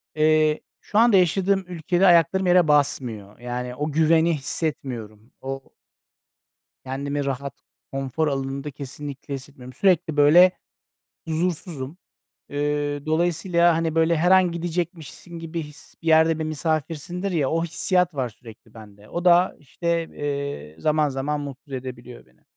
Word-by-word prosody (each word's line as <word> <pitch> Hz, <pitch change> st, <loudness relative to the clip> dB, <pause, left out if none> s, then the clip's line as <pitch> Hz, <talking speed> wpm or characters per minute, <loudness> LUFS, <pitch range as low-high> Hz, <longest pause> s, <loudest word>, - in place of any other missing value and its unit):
eee, 155 Hz, 0 st, +3 dB, 0.2 s
şu 205 Hz, -, -3 dB
anda 230 Hz, -4 st, +6 dB
yaşadığım 190 Hz, +2 st, +2 dB
ülkede 175 Hz, +2 st, +1 dB
ayaklarım 180 Hz, +2 st, +4 dB
yere 180 Hz, -2 st, +5 dB
basmıyor. 120 Hz, -9 st, 0 dB
Yani, 125 Hz, +1 st, -4 dB
o 150 Hz, +3 st, -3 dB
güveni 160 Hz, +2 st, +3 dB
hissetmiyorum. 125 Hz, -7 st, -4 dB
O 135 Hz, 0 st, -6 dB, 1.1 s
kendimi 140 Hz, +2 st, -3 dB
rahat 140 Hz, 0 st, -3 dB, 0.4 s
konfor 135 Hz, +3 st, -1 dB
alanında 135 Hz, +1 st, -3 dB
kesinlikle 140 Hz, +1 st, -8 dB
hissetmiyorum. 130 Hz, -2 st, -9 dB
Sürekli, 175 Hz, -4 st, +2 dB
böyle, 165 Hz, +6 st, +7 dB, 0.8 s
huzursuzum. 160 Hz, -2 st, -3 dB, 0.5 s
Eee, 145 Hz, 0 st, -2 dB
dolayısıyla, 170 Hz, +1 st, +2 dB
hani, 165 Hz, -1 st, -1 dB
böyle, 165 Hz, +1 st, +3 dB
her 175 Hz, +4 st, +2 dB
an 185 Hz, -2 st, +5 dB
gidecekmişsin 170 Hz, 0 st, -5 dB
gibi 165 Hz, 0 st, -5 dB
his, 150 Hz, 0 st, -13 dB
bir -, -, -12 dB
yerde 160 Hz, 0 st, +5 dB
bir 160 Hz, -, -2 dB
misafirsindir, 160 Hz, +4 st, -2 dB
ya, 150 Hz, -6 st, +1 dB
o 165 Hz, +1 st, 0 dB
hissiyat 180 Hz, +1 st, +1 dB
var 130 Hz, -3 st, -1 dB
sürekli 115 Hz, 0 st, -16 dB
bende. 105 Hz, -1 st, -14 dB
O 175 Hz, +1 st, -4 dB
da, 175 Hz, +1 st, +5 dB
işte, 170 Hz, +3 st, -2 dB
eee, 140 Hz, -, -4 dB
zaman 155 Hz, -1 st, +2 dB
zaman 140 Hz, +2 st, -2 dB
mutsuz 140 Hz, 0 st, -9 dB
edebiliyor 125 Hz, -, -8 dB
beni. 65 Hz, 0 st, -29 dB
150 Hz, 135 wpm, -24 LUFS, 135-170 Hz, 1.1 s, böyle